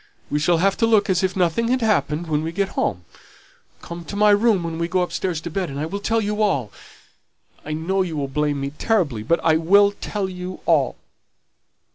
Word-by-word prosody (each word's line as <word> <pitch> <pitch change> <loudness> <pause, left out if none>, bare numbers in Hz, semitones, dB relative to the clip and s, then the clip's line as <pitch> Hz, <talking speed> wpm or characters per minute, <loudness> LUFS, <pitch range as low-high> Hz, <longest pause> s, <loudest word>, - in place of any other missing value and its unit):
We 150 - +1
shall 170 +3 +2
have 195 +3 +1
to 230 - +2
look 215 -3 +3
as 180 - +1
if 185 -1 -1
nothing 185 +5 +1
had 255 +1 +1
happened 175 -7 +1
when 155 -2 0
we 160 +1 -3
get 195 +2 -1
home. 90 0 -2 0.8
Come 170 0 -7
to 200 - -7
my 210 0 +5
room 205 -3 +3
when 165 -1 -4
we 170 - 0
go 180 +1 +1
upstairs 175 -1 -2
to 170 - -6
bed, 185 0 -2
and 140 +1 -6
I'll 160 +7 -3
tell 225 +2 0
you 210 0 -2
all. 140 - 0 0.9
I 155 - -5
know 180 +5 -1
you'll 155 -6 -2
blame 145 +1 -1
me 140 0 -3
terribly, 155 - 0
but 165 +10 +1
I 160 -1 +4
will 200 +5 +4
tell 205 -1 -4
you 180 0 -7
all." 145 -7 +2
175 Hz, 205 wpm, -22 LUFS, 155-200 Hz, 0.9 s, my